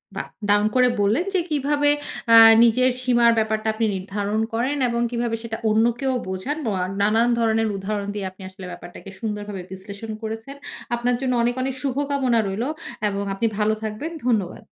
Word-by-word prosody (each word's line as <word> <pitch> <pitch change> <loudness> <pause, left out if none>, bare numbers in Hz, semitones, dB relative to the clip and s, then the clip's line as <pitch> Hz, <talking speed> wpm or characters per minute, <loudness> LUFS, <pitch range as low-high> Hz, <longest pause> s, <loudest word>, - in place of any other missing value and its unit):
বাহ! - - -4 0.2
দারুণ 205 +1 +4
করে 250 0 +5
বললেন 215 - +2
যে 375 - +3
কিভাবে 290 0 +1 0.4
আ - - +10 0.3
নিজের 250 +2 +4
সীমার 240 -2 +4
ব্যাপারটা 220 0 0
আপনি 225 +1 0
নির্ধারণ 200 +2 -2
করেন, 255 +6 0
এবং 235 0 -1
কিভাবে 235 -1 -1
সেটা 225 -1 -4
অন্যকেও 235 +5 +2
বোঝান। 190 +11 -3
ম - - -2 0.2
আ - - 0 0.2
নানান 220 +4 +3
ধরনের 225 -1 +2
উদাহরণ 200 +1 -3
দিয়ে 200 -2 -3
আপনি 190 - -18
আসলে 190 0 -11
ব্যাপারটাকে 175 +2 -10
সুন্দরভাবে 210 -3 -4
বিশ্লেষণ 200 +3 -8
করেছেন। 225 +5 -6 0.4
আপনার 240 +1 0
জন্য 260 -1 0
অনেক, 240 +1 +1
অনেক 265 0 -2
শুভকামনা 275 -3 0
রইলো, 220 +8 -2 0.4
এবং 200 0 -3
আপনি 225 +4 0
ভালো 215 0 +2
থাকবেন। 220 +10 -4
ধন্যবাদ। 215 -8 0
225 Hz, 165 wpm, -23 LUFS, 205-250 Hz, 0.4 s, আ